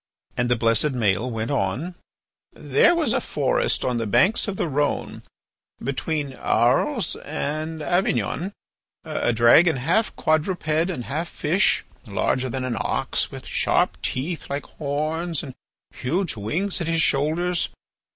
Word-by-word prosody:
And 120 -1 0
the 125 - +4
blessed 115 +5 +2
Maël 110 0 +1
went 115 +1 -3
on: 135 - -1 0.6
"There 345 - +3
was 335 -2 +1
in - - +2
a - - -1
forest - - 0
on 125 -2 0
the 115 -1 -2
banks 185 - +3
of 200 - -2
the 175 - -1
Rhone, 145 0 -1 0.6
between 140 +2 -2
Arles 190 - +1
and 155 +1 -4
Avignon, 185 +2 0 0.5
a - - 0
dragon 120 +9 +6
half 165 - +1
quadruped 155 +2 0 0.2
and 130 -10 -4
half 160 +5 -2
fish, 170 +4 +1 0.2
larger 120 +6 0
than 130 +1 -3
an 120 -2 -2
ox, - - -1
with - - -8
sharp - - +1
teeth 155 +5 -3
like 140 +1 -3
horns 155 +3 -2
and 135 -4 -7 0.4
huge 170 +6 -1
wings 170 - -1
at 165 - -2
his 165 -1 +2
shoulders. 165 +5 +1
150 Hz, 140 wpm, -23 LUFS, 125-175 Hz, 0.6 s, dragon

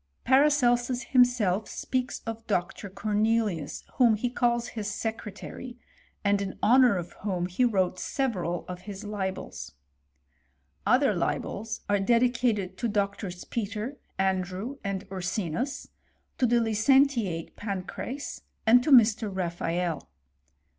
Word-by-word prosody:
Paracelsus 255 -3 +3
himself, 235 -6 +3
speaks 255 0 -2
of 225 0 -6
Dr. 195 0 -2
Corne 205 +2 -1
lius, 215 -9 0
whom 235 -4 +5
he 240 +3 -2
calls 240 -1 +1
his 210 -3 -4
secretary, 225 +3 -6 0.5
and 200 -1 +2
in 195 -1 -4
honour 245 -1 +6
of 175 -1 -6
whom 185 -4 -1
he 180 +7 0
wrote 190 -6 +1
several 185 - -2
of 180 0 -7
his 200 +1 -7
libels. 195 - -5 1.1
Other 250 +1 +4
libels 220 +4 -2
are 205 0 +2
dedicated 230 -4 +1
to 235 - 0
Doctors 200 -3 -2
Peter, 225 +4 -4 0.2
Andrew, 190 +6 -1
and 195 -1 -3
Ursinus, 190 - -3 0.5
to 250 - +4
the 240 +1 +3
licentiate 225 - +2
Pancrace, 205 +7 -5 0.2
and 245 +2 +6
to 305 - -1
Mr. 225 -5 +6
Raphael. 175 -2 -2
215 Hz, 120 wpm, -28 LUFS, 190-245 Hz, 1.1 s, honour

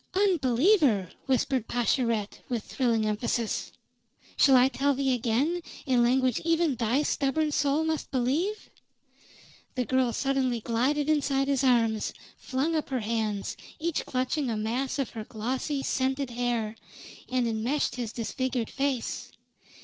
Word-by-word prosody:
"Unbeliever!" 285 - +3 0.2
whispered 260 -2 +1
Pascherette 230 -3 0
with 235 -4 -2
thrilling 230 -4 0
emphasis. 220 +1 -1 0.6
"Shall 270 -2 +6
I 250 0 +6
tell 275 +1 +1
thee 270 -1 +1
again, 255 +9 0 0.2
in 255 -4 +3
language 255 0 +2
even 330 -2 +2
thy 240 +5 +1
stubborn 300 +2 0
soul 290 +1 +1
must 320 -1 -2
believe?" 290 - -1 1.0
The 250 -1 0
girl 260 -1 +2
suddenly 265 -1 0
glided 260 +6 0
inside 280 -3 +1
his 275 -1 +1
arms, 230 -4 +2 0.2
flung 280 +6 -1
up 310 - -1
her 260 -3 -1
hands, 215 -2 -2 0.2
each 330 0 -2
clutching 255 +2 -1
a 225 - -1
mass 245 +6 -1
of 275 -3 -2
her 220 -2 -6
glossy, 260 +6 -3
scented 265 0 -1
hair, 235 -3 -1 0.6
and 255 -2 +1
enmeshed 230 +6 0
his 240 -3 -4
disfigured 245 0 -2
face. 270 -3 -2
260 Hz, 135 wpm, -28 LUFS, 235-280 Hz, 1.0 s, Shall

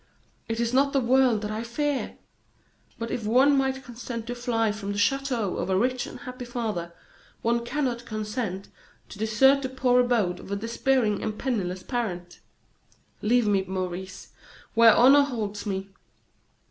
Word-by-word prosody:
It 225 0 -3
is 235 0 0
not 275 +2 +3
the 275 - +3
world 250 -3 +3
that 210 - -3
I 215 +1 -3
fear! 280 +4 -2 0.8
But 230 0 -5
if 230 - -3
one 260 +7 +4
might 265 0 0
consent 235 -1 -7
to 245 - -4
fly 235 -3 0
from 205 -1 -5
the - - -5
chateau 245 -2 0
of - - -3
a 190 - +2
rich 250 +4 0
and - - -10
happy 255 -1 -7
father, 220 -8 -4 0.5
one 235 +1 +1
cannot 245 -2 -2
consent 210 -3 -4 0.4
to 200 - -11
desert 265 +6 +4
the 260 - -3
poor 255 -1 +2
abode 235 -8 +1
of - - -11
a - - 0
despairing 230 0 0
and 215 -1 -3
penniless 190 -8 -2
parent. 180 -8 -4 0.8
Leave 240 +2 +3
me, 200 -2 +2
Maurice, 185 0 -5 0.4
where 230 -1 +7
honor 270 +4 +7
holds 215 -7 -3
me. 195 0 -3
230 Hz, 160 wpm, -26 LUFS, 205-255 Hz, 0.8 s, where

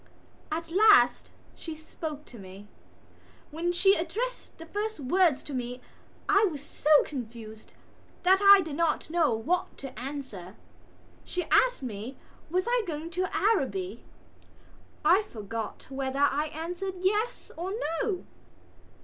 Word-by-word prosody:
At 330 +1 -3
last 380 - +5 0.2
she 325 -2 -7
spoke 310 -1 -7
to 235 - -12
me. 195 +2 -11 0.8
When 335 +3 -1
she 385 +3 +4
addressed 425 +9 -3
the 330 - -10
first 415 +3 -3
words 315 +2 +2
to 290 - -8
me 250 -1 -4 0.5
I 400 +1 +5
was 300 -7 -3
so 295 - -4
confused 230 -5 -8 0.5
that 380 +2 +5
I 400 -1 +9
did 320 -5 -5
not 320 -1 0
know 330 -5 +3
what 330 +12 -1
to 260 -5 -8
answer. 245 -9 -7 0.7
She 360 - -3
asked - - +4
me 235 +2 -6 0.3
was 365 +3 0
I - - +2
going 320 +1 -5
to 365 +2 -1
Araby. 235 - 0 1.0
I 355 +6 +6
forgot 225 - -6
whether 270 0 -3
I 285 +2 +2
answered 350 +5 -5
yes 420 +5 0
or 355 +3 -4 0.3
no. 430 -7 -2
315 Hz, 130 wpm, -28 LUFS, 255-370 Hz, 1.0 s, I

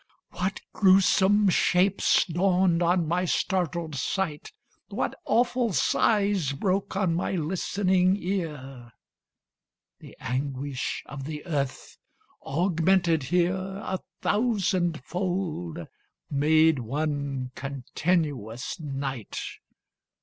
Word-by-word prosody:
What 190 +2 -3
gruesome 195 +1 +4
shapes 185 +2 +3
dawned 180 0 +2
on 175 -1 +2
my 180 +3 +1
startled 170 -3 -1
sight 150 +3 -2 0.4
What - - -2
awful 245 -2 +1
sighs 200 -8 +2
broke 190 +6 -1
on 190 -4 +1
my 175 +3 -1
listening 185 +2 +1
ear! 145 - -5 1.1
The - - -14
anguish 135 +1 -3
of 135 0 -7
the 150 0 -6
earth, 140 -5 -3 0.4
augmented 170 +1 +2
here 175 +6 +1 0.3
A 190 0 -2 0.2
thousand 190 - +1
fold, 175 -2 -3 0.5
made 155 +1 +4
one 140 0 -3
continuous 135 - -2
night. 135 -6 -5
170 Hz, 90 wpm, -26 LUFS, 145-190 Hz, 1.1 s, gruesome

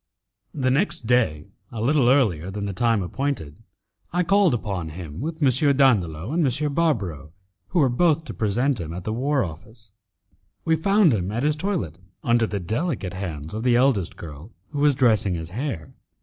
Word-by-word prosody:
The 130 -3 +1
next 140 - 0
day, 110 -11 +1 0.3
a 115 - -6
little 130 +2 +3
earlier 100 - +2
than 100 +1 -4
the 100 - -3
time 115 0 +1
appointed, 90 - -4 0.5
I 180 +1 +1
called 190 -4 +3
upon 95 -7 -4
him 80 -2 -8
with 160 +6 -3
M. 140 +1 +3
Dandolo 100 - +2
and 170 0 +2
M. 140 +2 0
Barbaro, 95 - -1 0.3
who 180 - -3
were 145 -5 +5
both 160 +5 +2
to - - -6
present 120 +5 0
him 80 -1 -6
at 90 - -6
the 110 - -3
war 135 +3 +1
office. 105 +6 -10 0.7
We 165 -1 +3
found 195 - +3
him 95 -2 -1
at 115 +4 -2
his 150 0 +2
toilet 155 - -3 0.2
under 120 -1 +2
the 100 - -3
delicate 110 - -2
hands 80 -5 -6
of 110 - -3
the 125 0 +3
eldest 120 -8 +2
girl, 80 +5 -10 0.2
who 145 - -5
was 145 -1 +4
dressing 110 -8 +2
his 80 -1 -5
hair. 115 - -4
115 Hz, 180 wpm, -23 LUFS, 90-145 Hz, 0.7 s, were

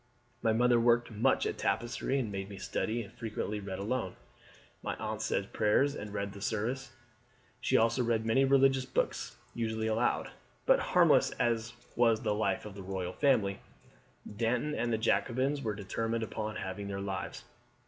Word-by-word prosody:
My 115 - +3
mother 120 +1 +4
worked 120 0 +3
much 115 +5 +2
at - - -2
tapestry 120 +3 0
and 120 -6 -1
made 95 0 -4
me 100 - -8
study, 110 +4 -2
and 100 - -13
frequently 105 -2 -3
read 95 -2 -5
alone. 115 +5 -2 0.7
My - - -3
aunt 110 0 -4
said 100 -2 -1
prayers 120 +7 +3
and 105 -7 -6
read 100 -1 -3
the 100 - -10
service; 120 +5 -2 0.7
she 130 - +2
also 115 +3 +3
read 115 -2 +1
many 115 +4 +4
religious 135 -1 +4
books, 120 -1 -2 0.2
usually 110 -1 -2
aloud." 110 +2 +1 0.3
But - - +5
harmless - - +4
as 115 0 0 0.2
was 115 -2 +4
the - - +1
life 105 -2 0
of 105 - -7
the 100 - -8
royal 95 -1 -4
family, 110 -9 +2 0.8
Danton 120 +6 0
and 120 -3 -1
the 110 - +2
Jacobins 130 +5 +1
were 110 -5 -2
determined 115 +3 -2
upon 110 -1 -4
having 95 +2 -4
their 100 0 -4
lives. 95 -1 -4
110 Hz, 170 wpm, -31 LUFS, 105-120 Hz, 0.8 s, But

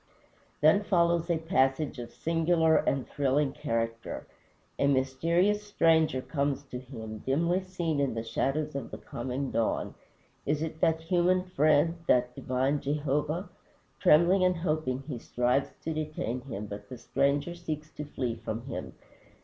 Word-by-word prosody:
Then 155 +7 +6
follows 170 -3 +2
a 170 - +2
passage 145 -4 +1
of 120 -1 -6
singular 165 0 +2
and 135 -1 0
thrilling 140 0 +1
character. 115 -5 -3 0.5
A 140 - +3
mysterious 165 +10 +2
stranger 160 -8 +2
comes 140 -2 -1
to 125 - -4
him, 110 -4 -8
dimly 170 - +1
seen 175 -5 -2
in 140 -5 0
the 115 - -2
shadows 140 +6 -1
of 135 -4 -4
the - - -7
coming 130 +3 -4
dawn. 115 - 0 0.5
Is 150 +2 0
it 160 0 -5
that 160 0 +3
human 180 +2 +2
Friend 155 -2 +3
that 125 0 +3
divine 130 +4 0
Jehovah? 150 +5 -1 0.5
Trembling 180 +2 +5
and 180 0 +3
hoping 155 -6 -1
he 135 -4 -5
strives 125 +4 +1
to 160 - -2
detain 155 -5 -3
him, 115 -6 -6
but 100 0 -8
the 125 - -7
stranger 140 +6 0
seeks 155 -3 -6
to 150 - -6
flee 125 -5 -2
from 115 +1 -5
him. 130 - -6
145 Hz, 150 wpm, -29 LUFS, 130-165 Hz, 0.5 s, Then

